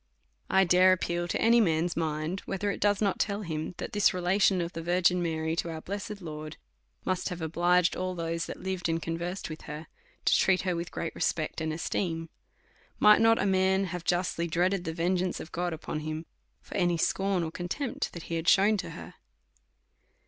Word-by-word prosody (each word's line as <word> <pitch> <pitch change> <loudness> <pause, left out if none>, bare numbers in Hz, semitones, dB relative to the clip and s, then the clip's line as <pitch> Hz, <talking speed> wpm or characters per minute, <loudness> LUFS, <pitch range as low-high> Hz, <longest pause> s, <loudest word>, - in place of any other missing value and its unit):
1 190 0 +4
dare 185 +1 +6
appeal 175 -1 -1
to - - -1
any 235 +1 +5
man's 170 -3 +1
mind, 160 +2 -2
whether 200 +1 -1
it - - -5
does 205 0 +2
not 200 -2 +1
tell 205 0 -1
him, 160 0 -4
that - - -6
this 205 -2 +3
relation 185 +1 +3
of 170 +1 -3
the 165 - -5
Virgin 180 +1 +2
Mary 160 -1 -1
to 170 - -2
our. 160 -1 -5
blessed 200 +2 -6
Lord, 155 -1 -7 0.5
must 185 0 -1
liave 180 -2 -5
obliged 175 +2 +2
all 185 0 -2
those 165 0 -2
that - - -7
lived 190 -2 -2
and 165 0 +1
conversed 170 +4 -4
with 155 -1 -8
her, 150 +2 -6 0.4
to - - +5
treat 185 -1 +3
her 180 -2 0
with 170 +1 -4
great 165 - -4
respect 155 0 -1
and 160 0 -1
esteem. 165 0 -2 0.7
Might 210 +1 +6
not 225 0 +5
a - - +1
man 190 0 +3
have 180 -2 -4
justly 175 -1 0
dreaded 180 +3 +1
the 160 - -2
vengeance 180 +1 0
of 160 - -8
God 175 +1 -2
upon 155 -1 -4
him, 155 +1 -5 0.4
for - - -10
any 175 -1 +2
scorn 190 +2 +1
and 160 0 -4
contempt 225 +9 -3
that 170 - -7
he 165 - -3
had 165 +1 -4
shewn 205 +3 +5
to 175 -3 -4
her? - - -9
175 Hz, 200 wpm, -29 LUFS, 165-190 Hz, 0.7 s, dare